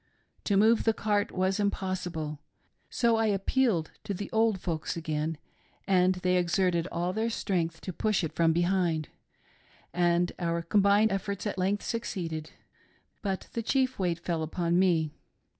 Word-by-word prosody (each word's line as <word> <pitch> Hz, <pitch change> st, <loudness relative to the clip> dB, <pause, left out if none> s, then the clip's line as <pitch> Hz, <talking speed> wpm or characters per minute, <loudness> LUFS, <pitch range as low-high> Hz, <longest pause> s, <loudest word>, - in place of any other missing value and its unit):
To 200 Hz, -, +2 dB
move 220 Hz, +3 st, +4 dB
the 225 Hz, -1 st, +3 dB
cart 205 Hz, -1 st, 0 dB
was 190 Hz, +2 st, 0 dB
impossible, 180 Hz, -7 st, -2 dB, 0.5 s
so 235 Hz, -2 st, +2 dB
I 225 Hz, 0 st, +2 dB
appealed 200 Hz, -3 st, +1 dB
to 200 Hz, -2 st, -2 dB
the 200 Hz, +2 st, -6 dB
old 220 Hz, -3 st, +2 dB
folks 170 Hz, -1 st, -3 dB
again, 155 Hz, -1 st, -2 dB, 0.5 s
and 185 Hz, -1 st, +4 dB
they 180 Hz, 0 st, +1 dB
exerted 175 Hz, -1 st, +1 dB
all 175 Hz, +2 st, -1 dB
their 220 Hz, +3 st, 0 dB
strength 170 Hz, -7 st, -2 dB
to 185 Hz, -, -5 dB
push 215 Hz, +1 st, 0 dB
it 160 Hz, -1 st, -3 dB
from 165 Hz, -1 st, +3 dB
behind, 175 Hz, -2 st, +1 dB, 0.8 s
and 175 Hz, 0 st, +2 dB
our 170 Hz, -1 st, -1 dB
combined 200 Hz, +4 st, +4 dB
efforts 200 Hz, +1 st, -3 dB
at 205 Hz, -2 st, -2 dB
length 195 Hz, +3 st, 0 dB
succeeded; 170 Hz, -9 st, -4 dB, 0.7 s
but 195 Hz, -2 st, -3 dB
th6 230 Hz, -, -2 dB
chief 260 Hz, -3 st, +1 dB
weight 175 Hz, -3 st, 0 dB
fell 170 Hz, -1 st, -2 dB
upon 170 Hz, +2 st, 0 dB
me. 165 Hz, -5 st, +2 dB
185 Hz, 150 wpm, -29 LUFS, 170-205 Hz, 0.8 s, move